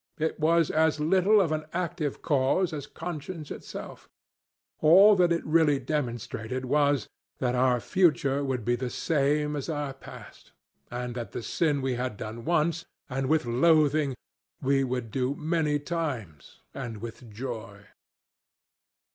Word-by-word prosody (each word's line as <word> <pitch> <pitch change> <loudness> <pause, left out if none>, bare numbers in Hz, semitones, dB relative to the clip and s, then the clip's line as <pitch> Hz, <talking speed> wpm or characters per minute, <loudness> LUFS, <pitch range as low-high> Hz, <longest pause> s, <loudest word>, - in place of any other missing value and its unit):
It 160 +1 -2
was 165 0 +3
as 160 -1 +2
little 190 +7 +4
of 175 -6 +2
an 155 0 -2
active 170 -4 -3
cause 155 +5 +2
as 145 -3 -5
conscience 160 -2 -7
itself. - - -8 0.7
All 195 +7 +7
that 180 -2 +3
it 170 - 0
really 155 -2 +3
demonstrated 125 -3 -3
was 145 -3 +2 0.3
that 125 -1 0
our 125 -1 +3
future 145 - +2
would 130 -5 -2
be 120 +1 +2
the 125 +1 -3
same 150 +1 0
as 145 +2 -4
our 145 -3 -2
past, 135 - -13 0.4
and 120 0 -4
that 120 -1 -6
the - - -4
sin 145 -2 0
we 130 -1 0
had 125 -5 -3
done 110 +3 -7
once, 165 0 +1 0.3
and 130 0 -1
with 155 -4 +2
loathing, 150 +2 +3 0.4
we 135 0 +2
would 125 -3 -3
do 130 +3 -1
many 155 -1 0
times, 140 - -5
and 120 -5 -6
with 115 +2 -9
joy. 110 -3 -7
145 Hz, 145 wpm, -27 LUFS, 125-160 Hz, 0.7 s, All